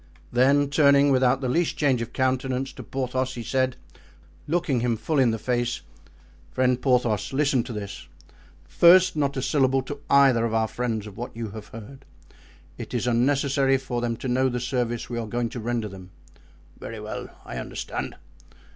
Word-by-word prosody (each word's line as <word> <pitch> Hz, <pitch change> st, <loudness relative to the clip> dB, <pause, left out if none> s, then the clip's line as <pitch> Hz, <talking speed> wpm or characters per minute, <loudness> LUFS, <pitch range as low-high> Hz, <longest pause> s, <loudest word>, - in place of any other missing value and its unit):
Then 140 Hz, +3 st, +3 dB
turning, 140 Hz, -1 st, +5 dB
without 130 Hz, 0 st, +3 dB
the 130 Hz, -, -1 dB
least 165 Hz, +7 st, 0 dB
change 135 Hz, -5 st, +2 dB
of 115 Hz, +1 st, -5 dB
countenance, 130 Hz, 0 st, -1 dB
to -, -, -9 dB
Porthos, 130 Hz, 0 st, -3 dB
he 120 Hz, -, -5 dB
said, 130 Hz, +1 st, 0 dB, 0.7 s
looking 160 Hz, -5 st, 0 dB
him 115 Hz, -1 st, 0 dB
full 150 Hz, +6 st, -1 dB
in 130 Hz, -3 st, +4 dB
the 110 Hz, -, -1 dB
face: 120 Hz, +1 st, -1 dB, 0.7 s
"Friend 125 Hz, -1 st, +1 dB
Porthos, 120 Hz, -6 st, +1 dB
listen 140 Hz, -2 st, +2 dB
to -, -, -7 dB
this; 100 Hz, -3 st, -7 dB, 0.6 s
first, 185 Hz, +1 st, +6 dB
not 140 Hz, -2 st, 0 dB
a 130 Hz, -, -1 dB
syllable 135 Hz, -3 st, +2 dB
to 145 Hz, +2 st, -7 dB
either 135 Hz, -4 st, +5 dB
of 115 Hz, -1 st, -1 dB
our 110 Hz, 0 st, +2 dB
friends 115 Hz, -3 st, -3 dB
of 105 Hz, -2 st, -11 dB
what 120 Hz, -1 st, -6 dB
you 115 Hz, -3 st, -4 dB
have 110 Hz, +1 st, -9 dB
heard; 120 Hz, +5 st, -11 dB, 0.8 s
it 120 Hz, +1 st, -6 dB
is 120 Hz, -, -1 dB
unnecessary 135 Hz, +2 st, +2 dB
for 125 Hz, -2 st, -4 dB
them 115 Hz, -1 st, -2 dB
to 130 Hz, -, -5 dB
know 130 Hz, +1 st, +2 dB
the 125 Hz, 0 st, -2 dB
service 120 Hz, -2 st, -2 dB
we 120 Hz, -1 st, -4 dB
are 115 Hz, -, -4 dB
going 120 Hz, +2 st, -2 dB
to 120 Hz, -, -6 dB
render 115 Hz, -1 st, -2 dB
them." 95 Hz, -2 st, -11 dB, 0.7 s
"Very -, -, -7 dB
well; -, -, -6 dB, 0.2 s
I -, -, -7 dB
understand." -, -, -5 dB
125 Hz, 180 wpm, -25 LUFS, 115-135 Hz, 0.8 s, first